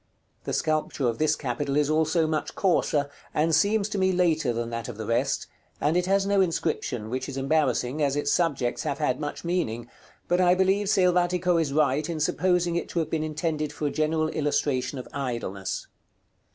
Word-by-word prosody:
The - - -3
sculpture 155 -4 0
of 115 -1 -2
this 155 0 +3
capital 140 +1 -2
is 150 -1 +3
also 160 +2 +2
much 155 -1 -2
coarser, 155 -6 +1 0.3
and 160 +2 +2
seems 205 +4 +3
to 210 -2 -2
me 190 0 +3
later 165 -7 +2
than 115 0 -3
that 115 0 -4
of 115 - -7
the 110 - -5
rest; 115 +2 0 0.3
and 150 +3 +1
it 180 0 +1
has 195 0 +2
no 200 -1 +3
inscription, 150 - -1
which 130 +1 -3
is 135 - -6
embarrassing, 135 -1 +1
as 140 -1 +2
its 145 0 0
subjects 140 -8 0
have 140 - -2
had 140 -4 0
much 145 -1 -5
meaning; 120 -10 -1 0.4
but 175 +1 +2
I 180 0 +5
believe 190 +2 +2
Selvatico 180 -2 +3
is 150 -4 -1
right 150 +1 +1
in 165 -2 -3
supposing 175 +2 +1
it 170 - -2
to - - -6
have 165 - 0
been 155 -1 0
intended 155 -1 -2
for 150 - -5
a 145 - 0
general 155 +1 0
illustration 145 -3 -1
of 125 - -7
Idleness. 115 -8 -3
155 Hz, 190 wpm, -26 LUFS, 135-175 Hz, 0.4 s, I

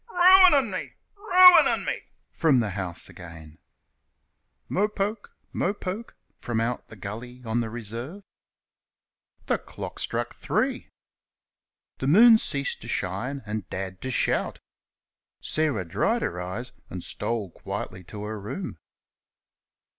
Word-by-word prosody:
"Ruinin' 355 - +6
me! 185 - -5 0.2
ruinin' 370 -3 +7
me!" - - -2 0.3
from 155 -5 +3
the 110 -4 +1
house 90 -2 -4
again. 80 -3 -12 1.1
"Mo 205 +3 +1
poke, 210 0 -4 0.2
mo 195 +3 0
poke," 205 +4 -6 0.2
from 120 -2 -2
out 115 +2 -2
the - - -11
gully 115 +5 -8
on 115 +1 0
the 115 -2 -2
reserve. 120 - -7 1.2
The - - +1
clock - - -8
struck - - -2
three. - - -1 1.1
The 130 - -2
moon 220 +8 +8
ceased 140 -7 -2
to - - -9
shine, 120 +10 -2
and 105 -3 -5
Dad 95 -1 -5
to 130 - -4
shout. 125 - 0 0.8
Sarah 145 -12 0
dried 85 - 0
her 90 +1 -3
eyes 105 +8 -5 0.2
and 90 -1 -6
stole 105 -3 -3
quietly 95 - -6
to 105 +3 -8
her 105 0 -5
room. 180 - -6
120 Hz, 125 wpm, -26 LUFS, -, 1.2 s, moon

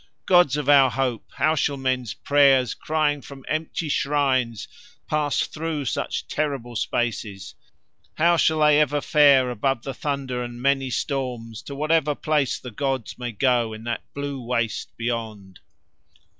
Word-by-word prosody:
Gods 175 -7 +4
of 150 - -3
our 140 -2 +6
hopes, 125 -3 -3
how 155 - +2
shall 145 -2 0
men's 130 -3 -2
prayers 140 -3 +3
crying 150 -2 0
from 135 -2 -12
empty 155 +1 -2
shrines 135 -6 0 0.4
pass 150 -2 0
through 155 -2 -4
such - - -3
terrible 135 -6 -3
spaces; 105 -4 -3 0.6
how 170 +2 +4
shall 160 -1 +2
they 150 -1 +5
ever 145 0 +1
fare 140 -4 +4
above 120 +1 -1
the 135 - -5
thunder 135 -3 -3
and 120 0 -6
many 135 0 +1
storms 125 -5 -3
to 140 - -8
whatever 155 0 +1
place 150 -4 0
the 125 - -9
gods 135 -1 -3
may 120 -1 -4
go 120 0 +1
in 110 +1 -9
that 120 0 -3
blue 140 -2 -4
waste 115 -2 -2
beyond? 110 -6 -4
135 Hz, 145 wpm, -23 LUFS, 120-145 Hz, 0.6 s, our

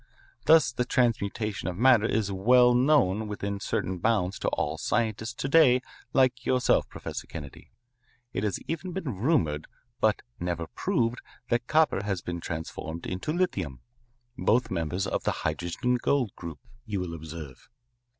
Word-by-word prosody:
Thus 160 -7 +6
the 125 - -1
transmutation 110 -4 0
of 90 -1 -3
matter 120 -2 +5
is 105 -3 0
well 125 +6 +5
known 120 -6 +3
within 100 -1 -3
certain 95 -2 -2
bounds 100 -2 +1
to - - -2
all - - -1
scientists 115 -1 -1
to 135 - -3
day 135 -4 +6 0.3
like 130 -2 +3
yourself, 125 -1 +2
Professor - - -6
Kennedy. 75 -5 -9 0.6
It - - -2
has 105 -2 0
even 170 +2 -4
been 150 - -4
rumoured 100 - +1 0.3
but - - +2 0.2
never 85 -1 -2
proved 115 +7 -1 0.3
that 120 +1 0
copper 155 -10 +3
has 95 -4 -2
been 85 -1 -4
transformed 80 0 -5
into 95 +11 -3
lithium 95 - -1 0.6
both 110 +7 +2
members 90 +4 -1
of - - -2
the - - +1
hydrogen 120 +9 0
gold 130 -8 +1
group, 85 -3 -7 0.3
you 105 -2 -2
will 90 -2 -4
observe. 80 -4 -9
105 Hz, 150 wpm, -28 LUFS, 90-125 Hz, 0.6 s, Thus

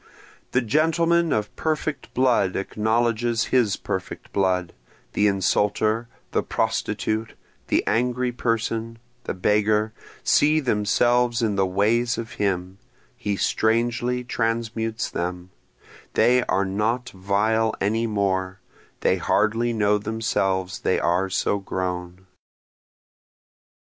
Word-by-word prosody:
The 125 - +2
gentleman 165 +5 +2
of 105 -1 -1
perfect 155 -3 -2
blood 120 -7 +2
acknowledges 115 +3 0
his 120 -6 +3
perfect - - -5
blood, 90 -2 +1 0.4
The 105 - +3
insulter, 105 +3 +1 0.2
the - - +1
prostitute, 110 +1 -2 0.3
the - - +1
angry 125 +2 +1
person, 115 -1 -2 0.3
the - - -3
beggar, 105 +3 +2 0.3
see 155 +1 +4
themselves 120 0 +2
in 105 -3 +1
the 95 -1 +2
ways 115 +6 +1
of 115 +1 -5
him, 95 -1 -1 0.4
he 105 -4 -2
strangely 120 +4 +1
transmutes 115 -1 -2
them, 90 +1 -4 0.6
They 125 +1 +4
are 100 - +1
not 110 +6 -1
vile 105 +4 +1
any 110 +3 0
more, 95 -3 -1 0.4
they - - +2
hardly 115 +3 +1
know 105 -2 +2
themselves 100 -3 -1
they - - +1
are 90 +3 +1
so 100 +2 0
grown. 90 -1 -4
110 Hz, 110 wpm, -24 LUFS, 100-120 Hz, 0.6 s, see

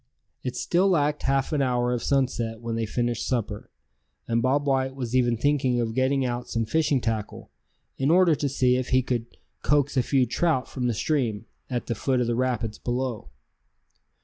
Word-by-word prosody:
It 125 - -4
still 185 +3 +2
lacked 150 -4 +1
half 135 +2 0
an 145 - +1
hour 125 -2 +1
of 120 - -2
sunset 120 -4 0
when 115 0 -4
they 115 -1 -1
finished 120 0 -1
supper; 110 -4 -2 0.6
and 115 0 +1
Bob 140 +3 +1
White 135 -1 0
was 125 -2 -4
even 120 -2 +3
thinking 130 -2 +1
of 115 -1 -1
getting 130 +2 +1
out 120 0 -3
some 115 -1 -1
fishing 150 +2 +1
tackle, 115 -3 -4 0.5
in 135 +1 +1
order 175 0 +5
to 145 -1 -1
see 125 -2 +2
if 130 0 -3
he 130 0 +3
could 120 -2 -2 0.3
coax 145 -1 +2
a - - +5
few 130 +1 +2
trout 130 +2 0
from 125 -2 -3
the 120 - 0
stream, 120 - -1 0.2
at 125 -2 -2
the - - -1
foot 130 +4 0
of 125 - +1
the 120 - 0
rapids 120 -3 -1
below. 120 - -3
125 Hz, 190 wpm, -25 LUFS, 120-135 Hz, 0.6 s, order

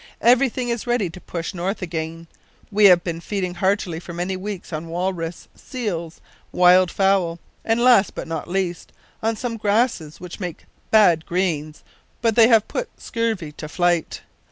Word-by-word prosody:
Everything 250 0 +3
is 235 0 -3
ready 235 -8 0
to 180 +1 -11
push 170 +2 -5
north 185 +3 -3
again. 165 -1 -5 0.5
We 210 +1 +4
have 180 -3 +7
been 170 -1 -4
feeding 185 -1 -3
heartily 190 -2 0
for 175 0 -9
many 180 +2 -2
weeks 190 -2 -6
on 155 +2 -4
walrus, 175 -1 -3
seals, 180 - -5 0.3
wild 180 0 +5
fowl, 190 -4 +1 0.3
and 225 +1 +1
last, 240 -5 +4
but - - -5
not 165 - -4
least, 180 -1 -3 0.3
on 225 +1 0
some 230 +1 -4
grasses 210 -7 0
which 180 +2 -9
make 180 -4 -6 0.2
bad 175 -7 +4
greens, 160 -4 -2 0.4
but 230 -2 +1
they 230 -2 +7
have 225 -3 +4
put - - -3
scurvy 225 -9 -2
to 155 +1 -8
flight. 175 0 0
185 Hz, 160 wpm, -22 LUFS, 170-220 Hz, 0.5 s, have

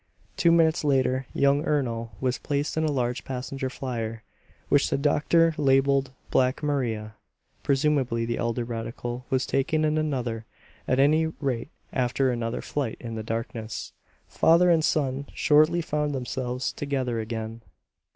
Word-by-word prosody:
Two 170 - +4
minutes 165 -1 +3
later 130 -2 +1
young 140 +1 +2
Ernol 120 -7 -1
was 130 -1 -1
placed 145 0 -2
in 160 - +1
a 155 - +1
large 125 -4 -1
passenger 130 +1 -4
flier, 115 -4 -4 0.4
which 145 0 +3
the - - +1
doctor 160 +3 +3
labeled 135 -1 +3 0.2
"Black 130 +2 +2
Maria." 115 -7 -1 0.5
Presumably 135 -5 +1
the 115 0 -2
elder 120 +1 -1
radical 120 +1 -5
was 130 0 +1
taken 155 +3 +1
in 155 0 +1
another; 125 -7 -2 0.4
at 130 - +2
any 155 +3 +4
rate 140 -5 -3 0.2
after 130 +1 +1
another 115 -1 -2
flight 135 -6 -3
in 115 -2 -6
the 110 - -4
darkness, 115 -1 -5 0.3
father 175 +2 +4
and 160 -2 +3
son 140 -2 0
shortly 155 +3 +4
found 150 -2 -1
themselves 125 0 -3
together 130 -5 -2
again. 110 0 -5
130 Hz, 140 wpm, -26 LUFS, 120-145 Hz, 0.5 s, Two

